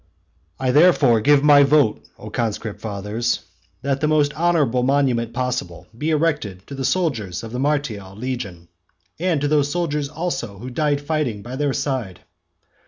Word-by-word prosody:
XII. 130 - 0
I - - +4
therefore 145 -6 +5
give 145 +4 +4
my 145 -1 +7
vote, 140 -5 +3 0.2
O - - -10
conscript 110 -2 -3
fathers, 110 +3 -2 0.4
that 140 0 -1
the 155 - +2
most 150 -1 +2
honourable 155 -6 +2
monument 125 -3 +1
possible 120 -9 -3
be 150 +7 -2
erected 150 - -1
to - - -10
the 135 -1 -4
soldiers 130 - -1
of 110 - -7
the 125 - -4
martial 130 -10 -2
legion, 110 -8 -5 0.5
and 175 -3 +1
to 145 - +1
those 145 -1 +2
soldiers 150 -3 -1
also 150 - -4
who 125 +6 -8
died 145 +1 0
fighting 145 -9 -2
by 125 +2 -6
their 145 +1 0
side. 130 -10 -3
135 Hz, 165 wpm, -21 LUFS, 115-150 Hz, 0.5 s, my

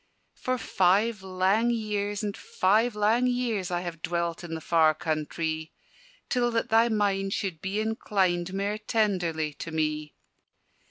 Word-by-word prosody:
"For 255 0 -2
five 205 +1 +2
lang 190 +5 +1
years, 210 -3 -1
and 205 -1 -2
five 215 +5 +1
lang 220 +4 +3
years, 235 -6 -1
I 175 -1 -1
have 170 -2 -6
dwelt 170 0 -2
in 165 -1 -5
the - - -4
far 160 -1 +3
countrie, 160 0 -2 0.6
Till 245 -2 +1
that 230 -1 -1
thy 225 +1 +5
mind 200 -3 +1
should 185 -6 -3
be 195 +2 -2
inclined 190 -5 0
Mair 200 +2 -2
tenderly 180 -9 0
to - - -5
me. 155 -1 -2
195 Hz, 145 wpm, -27 LUFS, 170-215 Hz, 0.6 s, thy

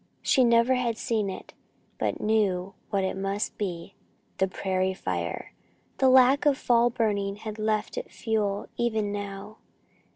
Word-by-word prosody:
She 260 - +4
never 235 +1 +4
had 240 -3 0
seen 215 -4 -1
it, 190 - -8 0.5
but - - -1
knew 195 -4 +1 0.2
what 200 -2 0
it 190 - -1
must 195 +2 -2
be 185 -2 -4 0.5
the 190 - +3
prairie 185 0 -1
fire! 85 - -4 0.5
The 265 - +5
lack 260 +3 +5
of 280 -2 +4
fall 240 -3 +3
burning 205 -4 -1
had 215 +1 -7
left 215 - -1
it - - -9
fuel 210 -3 -1
even 220 -3 0
now. 205 +1 -6
210 Hz, 150 wpm, -27 LUFS, 195-235 Hz, 0.5 s, The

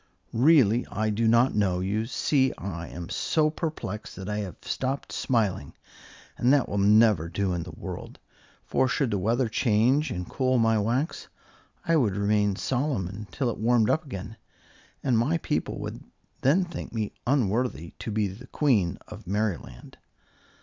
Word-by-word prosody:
"Really, 125 -3 +5
I 110 0 -1
do 110 +2 +1
not 120 +3 +4
know. 95 -4 +1
You 105 +4 -1
see, 135 0 +2
I 85 -3 -5
am 85 0 -8
so 155 +5 +1
perplexed 155 -9 -5
that 95 +1 -7
I 105 0 -2
have 95 -6 -5
stopped 135 +1 -3
smiling, 105 - 0 0.7
and 125 - +4
that 140 -2 +4
will 100 - -2
never 105 -4 +4
do 95 +1 -1
in 85 - -2
the - - -8
world; - - -7 0.5
for 130 - +2
should 130 0 0
the 100 - 0
weather 115 +6 +1
change 120 +6 +2
and 90 0 -4
cool 130 -1 +1
my 115 -1 +3
wax, 125 - -1 0.6
I 165 -1 +3
would 110 -10 +2
remain 100 0 +2
solemn 130 - -1
until 105 +6 -3
it - - -7
warmed 115 -1 +3
up 160 - +1
again, 110 - -7 0.7
and 125 -4 +2
my 145 +9 +2
people - - -2
would - - -6 0.4
then 165 +8 +3
think 170 -5 -7
me 110 -2 -2 0.2
unworthy 120 - 0
to - - -5
be 105 -1 0
the 105 +7 -10
Queen 110 - +1
of - - -11
Merryland." 95 - -3
110 Hz, 165 wpm, -27 LUFS, 100-130 Hz, 0.7 s, Really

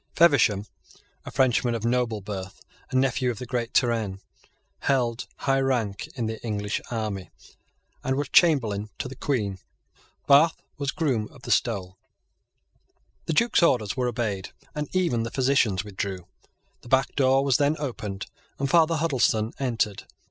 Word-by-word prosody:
Feversham, 115 - +4 0.6
a - - -6
Frenchman 120 -2 +2
of 115 0 -3
noble 120 -3 0
birth, 95 -1 -6 0.3
and 130 - +2
nephew 130 -1 +1
of 120 - -3
the 125 - -6
great 120 -1 -2
Turenne, 115 -6 +1 0.6
held 125 -4 0
high 135 -1 +2
rank 120 -7 -1
in 120 -4 -2
the 110 0 -4
English 105 -2 -2
army, 105 -5 -3 0.7
and 130 - 0
was 145 +1 -1
Chamberlain 110 - +3
to - - -3
the 130 - -8
Queen. 105 -10 -1 0.7
Bath 145 +4 +5 0.2
was 140 -1 -1
Groom 135 -10 0
of - - -17
the - - -4
Stole. 95 -5 0 1.3
The 165 - 0
Duke's 235 +7 +3
orders 120 -11 +2
were 125 -1 0
obeyed; 110 -5 -2 0.2
and 150 -1 -4
even 170 -11 +2
the 115 - -2
physicians 125 -8 +2
withdrew. 95 -3 -5 0.6
The - - -13
back 130 +1 +2
door 135 0 +3
was 135 -3 +4
then 145 +1 +2
opened; 110 -9 -4 0.3
and 140 - -1
Father 165 -1 +5
Huddleston 130 -8 +1
entered. 115 -6 -1
120 Hz, 150 wpm, -26 LUFS, 105-135 Hz, 1.3 s, Bath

